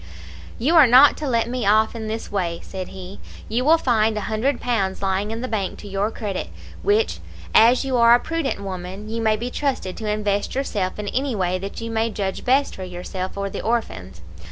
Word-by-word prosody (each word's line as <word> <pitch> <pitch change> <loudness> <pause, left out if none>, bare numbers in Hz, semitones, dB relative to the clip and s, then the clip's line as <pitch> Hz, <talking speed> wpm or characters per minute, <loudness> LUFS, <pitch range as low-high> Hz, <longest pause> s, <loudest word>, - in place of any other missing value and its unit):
"'You 295 +9 +1
are 300 -5 +8
not 255 +4 +7
to 300 - -4
let 230 -3 +1
me 250 0 -3
off 215 +3 +3
in 220 -1 -5
this 220 +1 -5
way,' 175 -4 -2
said 185 -2 -6
he. 190 +1 -10 0.3
'You 235 +3 -1
will 315 +4 +5
find 220 -7 +1
a - - -1
hundred 220 +6 -1
pounds 200 -6 -1
lying 195 +2 0
in 225 +1 -4
the 255 - -3
bank 205 -6 -2
to 205 - -10
your 200 +2 -1
credit, 210 -4 -4 0.3
which, 425 +2 +1 0.3
as 240 +4 +5
you 260 -2 0
are 235 0 +7
a - - +2
prudent 325 -3 -2
woman, 190 +1 -6
you 230 +1 -3
may 220 -1 +3
be 240 +3 -4
trusted 260 -11 -2
to 215 -1 -4
invest 210 0 -1
yourself 205 -9 -2
in 210 -1 -5
any 265 -2 -1
way 185 -2 0
that 195 +4 -6
you 230 0 -5
may 225 0 0
judge 195 -3 -3
best 270 +3 +2
for 190 - -7
yourself 185 +1 -6
or 200 0 -2
the - - -5
orphans. 95 - -3
220 Hz, 215 wpm, -22 LUFS, 195-245 Hz, 0.3 s, are